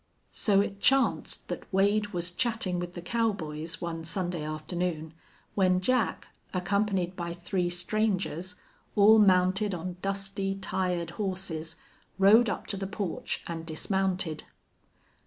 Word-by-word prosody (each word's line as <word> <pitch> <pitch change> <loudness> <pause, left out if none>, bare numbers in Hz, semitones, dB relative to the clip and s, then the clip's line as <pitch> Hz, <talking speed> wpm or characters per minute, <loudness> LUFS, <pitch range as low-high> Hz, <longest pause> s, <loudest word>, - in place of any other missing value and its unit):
So 200 -3 +4
it 200 0 -3
chanced 270 0 +2
that - - -6
Wade 205 +2 +3
was 175 -3 -3
chatting 215 -4 0
with 175 0 -5
the 175 - -6
cowboys 175 -7 -1
one 165 -1 -4
Sunday 175 -1 -2
afternoon 155 +1 -3 0.4
when 185 -2 +3
Jack, 250 +5 0 0.3
accompanied 190 -1 0
by 170 -1 -4
three 175 +1 -1
strangers, 185 -1 -1 0.4
all 215 +2 +7
mounted 190 0 +4
on 180 +1 -5
dusty, 195 0 -2
tired 180 -3 -2
horses, 180 -5 -3 0.4
rode 210 +4 +6
up - - -3
to - - -3
the 195 0 -3
porch 200 -3 -3
and 165 -1 -5
dismounted. 180 0 -1
185 Hz, 125 wpm, -29 LUFS, 175-200 Hz, 0.4 s, all